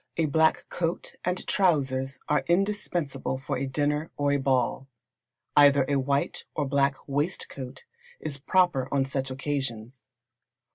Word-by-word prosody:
A 165 - +2
black 160 +2 +2
coat 170 0 -2
and 180 +1 -1
trousers 135 -8 +1
are 150 - +2
indispensable 175 -8 0
for 130 - -3
a 135 - -2
dinner, 150 +3 0
or 145 0 +1
a 145 - +3
ball. 130 -1 0 0.7
Either 140 -2 +6
a 140 -1 +2
white 140 +1 -1
or 150 - 0
black 140 0 +2
waistcoat 140 -3 -3 0.3
is 145 -3 -3
proper 150 -4 +2
on 135 -1 +2
such 135 0 -2
occasions. 130 -3 -4
140 Hz, 135 wpm, -27 LUFS, 135-155 Hz, 0.7 s, Either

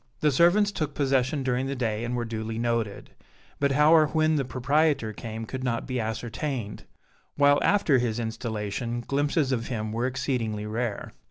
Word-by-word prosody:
The 150 - +3
servants 175 +8 +4
took 155 -7 -3
possession 135 0 +1
during 130 +1 0
the 140 - -2
day 115 -3 -2
and 120 +1 -2
were 120 -1 -2
duly 110 0 -4
noted, 115 -3 -2 0.5
but 140 -1 +2
how 150 +3 +5
or 155 -2 +6
when 155 +1 +2
the 140 - +1
proprietor 135 -1 +1
came 110 0 -6
could 130 +3 -6
not 115 -2 -1
be 130 -2 -2
ascertained, 115 +1 -4 0.5
while 145 0 +5
after 170 -10 +3
his 120 -2 -1
installation 115 0 -3
glimpses 145 +2 0
of 115 -3 -1
him 110 -3 -3
were 115 +3 0
exceedingly 115 -5 -2
rare. 110 0 -3
125 Hz, 170 wpm, -26 LUFS, 115-145 Hz, 0.5 s, or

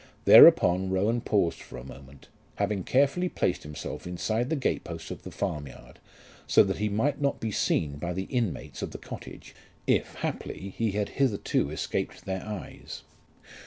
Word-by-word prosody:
Thereupon 95 +2 +8
Rowan 105 +6 +1
paused 100 -7 +1
for - - -10
a - - -8
moment, 65 +1 -13 0.3
having 100 -3 -1
carefully 140 - +2
placed 90 - -1
himself 75 +3 -7
inside 110 +7 -1
the 160 - +1
gate 135 - -1
posts 85 -1 -7
of - - -7
the - - -8
farmyard 70 -4 -6 0.5
so - - +6
that 95 0 -2
he 105 0 0
might 135 +8 0
not 140 -1 0
be 110 - -3
seen 75 -7 0
by 85 +4 -3
the 95 +2 -3
inmates 115 - -3
of - - -3
the - - -5
cottage, - - -10 0.3
if - - +1
haply 95 0 -5
he 115 -3 0
had 105 0 -1
hitherto 115 - 0
escaped 75 - -3
their 95 -1 -3
eyes. 105 -4 -8
95 Hz, 165 wpm, -28 LUFS, 85-115 Hz, 0.5 s, Thereupon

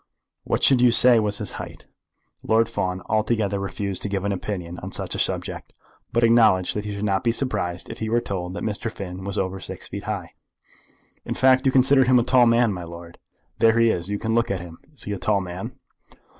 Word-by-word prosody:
What - - -1
should 130 -3 +5
you 125 - +6
say 120 0 +7
was 105 -1 -1
his 105 - -5
height?" - - -10 0.6
Lord 115 +1 +2
Fawn 95 -5 -3
altogether 110 -2 0
refused 100 0 -2
to 105 - -1
give 100 -1 -2
an 100 - 0
opinion 90 -3 -5
on - - -8
such - - -1
a - - -4
subject, - - -3 0.4
but 120 - +1
acknowledged 110 -6 +4
that 105 0 -3
he 105 -1 -4
should 100 +1 -3
not 95 -2 0
be 115 - +2
surprised 90 -9 -2
if - - -9
he 110 - -3
were 120 +1 +2
told 90 -4 -5
that - - -5
Mr. 110 +1 -3
Finn 95 -2 -8
was 100 0 -5
over 95 0 -2
six - - -9
feet - - -7
high. - - -5 0.9
"In - - -4
fact 130 +1 +4
you - - +4
consider 130 +1 +4
him 125 0 +4
a 120 - +3
tall 125 -1 +4
man, 115 -2 +3
my 90 -2 -6
lord? 85 0 -11 0.4
There 115 0 +4
he 115 -1 +4
is, 85 0 -3
you 105 - -1
can 110 +2 -2
look 115 0 +1
at 95 - -2
him. 85 -1 -11
Is 150 - -6
he 105 - -5
a 100 - -4
tall 105 0 +1
man?" 90 0 -7
105 Hz, 225 wpm, -23 LUFS, 95-115 Hz, 0.9 s, say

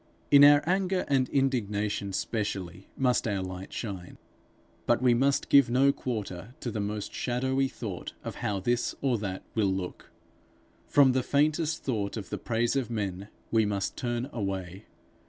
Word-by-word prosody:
In 140 0 +9
our 145 0 +8
anger 185 +1 +1
and 135 -2 +2
indignation, 105 -7 0
specially, 95 -3 -3
must 125 -3 +2
our 100 -3 -1
light 95 0 -7
shine. 95 -6 -6 0.7
But 120 - +4
we 125 -1 +4
must 135 +3 +2
give 140 -4 +6
no 135 +3 +4
quarter 110 -3 -5
to 120 - -3
the 110 - -3
most 105 0 -3
shadowy 130 +2 0
thought 105 -9 -6
of - - -6
how 100 -2 -1
this 120 +5 0
or 130 -5 +1
that 95 -2 -4
will 105 -4 +2
look. 95 -1 -5 0.8
From 140 -2 +5
the 130 0 +1
faintest 155 +4 +1
thought 110 -5 -2
of 100 - -7
the - - -3
praise 115 +2 0
of 135 -3 -1
men, 100 -4 -3 0.2
we 115 -1 +4
must 100 -2 -2
turn 120 0 -2
away. 95 -2 -4
115 Hz, 160 wpm, -28 LUFS, 100-130 Hz, 0.8 s, In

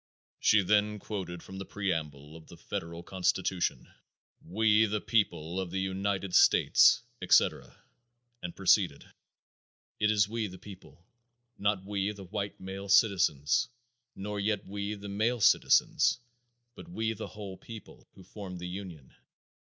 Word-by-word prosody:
She 105 -2 +4
then 105 +2 +2
quoted 95 -5 -6
from 95 0 -9
the 95 - -6
preamble 80 -7 -4
of 80 -1 -13
the - - -13
Federal 85 +1 -6
Constitution: 95 0 -1 0.6
"We, 110 +4 +3
the 105 +1 -1
people 95 -6 0
of 95 -2 -3
the 95 +2 -3
United 95 0 -2
States," - - +5 0.2
etc., - - +2 0.6
and 90 -1 -6
proceeded: 95 -6 +2 0.9
"It 105 - +2
was 105 -2 +3
we, 110 0 -2
the 95 -1 -10
people; 95 -3 -14 0.5
not 100 -2 0
we, 100 0 -1
the 100 -1 -11
white 100 +1 -5
male 95 +1 -7
citizens; 95 - +3 0.5
nor 105 +1 -5
yet 105 -1 -1
we 100 +1 -4
the 100 0 -9
male 110 +5 0
citizens; 100 - +4 0.6
but, 170 - -12
we 110 -9 -2
the 110 - -7
whole 100 -3 -8
people, 115 -2 -12
who 95 - -14
formed 95 -1 -8
the 90 0 -6
union. 90 -6 -8
100 Hz, 140 wpm, -30 LUFS, 90-105 Hz, 0.9 s, States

